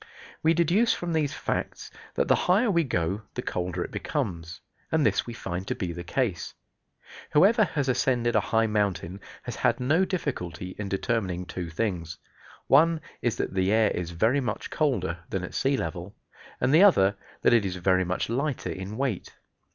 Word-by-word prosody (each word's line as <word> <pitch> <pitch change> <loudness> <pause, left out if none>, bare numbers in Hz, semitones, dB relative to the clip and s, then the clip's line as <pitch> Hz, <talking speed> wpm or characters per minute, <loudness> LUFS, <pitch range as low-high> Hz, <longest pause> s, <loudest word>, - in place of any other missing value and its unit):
We 165 +1 +3
deduce 175 +8 +3
from 175 -1 -3
these 150 -2 0
facts - - -3 0.2
that - - +1
the - - +5 0.2
higher 210 +5 +4
we 170 -2 +3
go 95 - -1
the - - -3
colder 90 0 -2
it - - -8
becomes; 90 - -3 0.3
and 160 -2 +2
this - - +1
we 120 - -5
find 95 -2 -5
to - - -1
be 90 -2 -3
the 85 +1 -6
case. 95 -2 -2 0.8
Whoever 205 +9 +6
has 145 -6 -2
ascended 120 -2 +1
a - - +6
high 115 0 +3
mountain 100 -4 -1 0.2
has - - -6
had - - +2
no 150 +9 +3
difficulty 90 - -3
in 100 -1 -3
determining 95 -3 -1
two 90 -1 -5
things. 85 -3 -3 0.5
One 160 +4 +5 0.2
is 120 -3 0
that - - -3
the 95 0 +1
air 110 -1 +4
is 90 -2 -3
very 110 +11 +2
much 120 -5 -4
colder 100 - 0
than 95 -2 -2
at 90 - -6
sea 135 0 +1
level, 90 -2 -5 0.4
and 125 +3 +2
the 160 - +7
other 100 - +5 0.3
that - - +5
it 115 -3 +5
is 95 -2 -3
very 95 +1 +2
much 90 +1 -2
lighter 135 +4 -2
in 95 +3 -6
weight. 130 -8 -3
110 Hz, 180 wpm, -27 LUFS, 90-145 Hz, 0.8 s, the